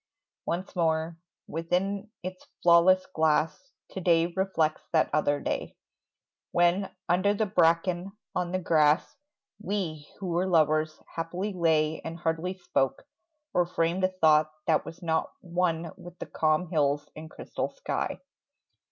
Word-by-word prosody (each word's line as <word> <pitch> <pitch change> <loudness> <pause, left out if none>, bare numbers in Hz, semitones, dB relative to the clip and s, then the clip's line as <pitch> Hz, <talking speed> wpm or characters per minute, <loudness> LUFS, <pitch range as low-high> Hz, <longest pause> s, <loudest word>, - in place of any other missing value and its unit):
Once 185 +4 -3
more... 160 -1 +1 0.3
Within 190 +5 -2
its 185 0 -7 0.2
flawless 175 +2 +6
glass 160 - +1 0.2
To 190 - -5
day 170 -1 +3
reflects 180 -5 +1
that 160 - +3
other 145 -1 +2
day, - - -3 0.7
When, 175 +3 +2 0.2
under 185 +4 +3
the 220 - +1
bracken, 175 0 +2 0.2
on 180 -1 -1
the 185 - +1
grass, 155 -3 +2 0.5
We 175 -8 -3
who 190 -3 -4
were 175 +2 +1
lovers 155 -2 +2 0.2
happily 180 +5 -3
lay 160 -3 +2
And 165 +1 -5
hardly 170 +2 -2
spoke, 135 -7 -1 0.5
or 175 -1 +2
framed 170 +2 0
a - - +6
thought 155 -4 +3
That 160 - +2
was 165 +2 -9
not 160 -1 0
one 170 -2 -1
with 175 -1 -12
the - - -6
calm 155 +3 0
hills 145 -2 +1
And 155 +1 -9
crystal - - -4
sky. - - -3
170 Hz, 135 wpm, -28 LUFS, 160-185 Hz, 0.7 s, flawless